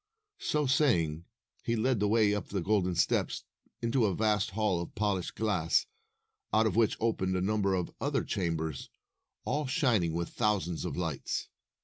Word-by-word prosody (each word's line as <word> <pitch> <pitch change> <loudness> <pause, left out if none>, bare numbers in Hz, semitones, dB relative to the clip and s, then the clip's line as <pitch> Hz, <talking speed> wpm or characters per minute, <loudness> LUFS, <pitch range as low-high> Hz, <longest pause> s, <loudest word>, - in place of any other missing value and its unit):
So 150 -1 0
saying, 90 - +2 0.4
he 115 - 0
led 120 +1 +1
the 105 - +2
way 105 -1 +4
up 105 - -3
the 100 - -1
golden 95 -2 +1
steps - - +1 0.4
into 115 0 +2
a 95 - -1
vast 105 -1 +1
hall 100 -3 0
of 85 - -8
polished 100 -3 -1
glass, 95 -7 +1 0.7
out 110 +2 +4
of 110 - 0
which 115 -2 +3
opened 95 -5 0
a - - 0
number 100 0 +1
of 90 -2 -3
other - - 0
chambers, 80 -5 -2 0.6
all 150 -1 -1
shining 115 - +2
with 85 0 -2
thousands 100 -7 0
of - - -4
lights. 80 -6 -3
105 Hz, 160 wpm, -30 LUFS, 90-110 Hz, 0.7 s, way